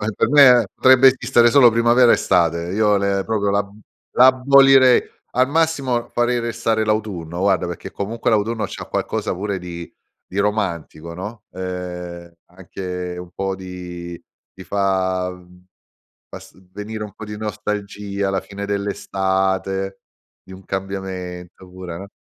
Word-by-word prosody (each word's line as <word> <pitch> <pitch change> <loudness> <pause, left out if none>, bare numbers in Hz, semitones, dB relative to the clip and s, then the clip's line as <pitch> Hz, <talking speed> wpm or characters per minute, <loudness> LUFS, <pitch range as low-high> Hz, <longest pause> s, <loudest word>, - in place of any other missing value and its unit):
Per - - +1
me 130 -4 +7
potrebbe 130 0 +6
esistere 120 -2 +3
solo 125 -1 +7
primavera 120 +1 +4
estate. 85 0 +1
Io 105 0 +3
le 100 -1 0
proprio 105 -2 0
l'ab 100 0 0 0.4
l'abolirei 130 0 +6 0.3
al 130 +1 +2
massimo 140 -6 0
farei 120 0 0
restare 115 -1 -1
l'autunno 100 -6 -2
guarda 95 -2 +1
perché 85 - -7
comunque 115 +4 -2
l'autunno 110 +1 0
c'ha - - -8
qualcosa - - -2
pure 100 +1 -3
di 85 -1 -8 0.4
di 95 - -3
romantico, 85 -6 -2
no, 105 +5 -8
ehm, 90 -2 -6 0.2
anche 90 0 -7
un 90 0 -8
po' 95 0 -3
di 90 -2 -8 0.3
ti 95 - -11
fa, 95 -1 0
mhmm, 90 0 -16 0.6
pass - - -11
uhm, 95 -1 -23
venire 105 +1 -6
un 105 - -12
po' - - -11
di 105 0 -7
nostalgia, 105 -1 -4
la 95 0 0
fine 100 0 -7
dell'estate, 95 -1 -2 0.4
di - - -16
un 95 +1 -13
cambiamento 95 -2 -6
pure, 90 -2 -8
no. 100 +3 -9
100 Hz, 140 wpm, -20 LUFS, 90-110 Hz, 0.6 s, me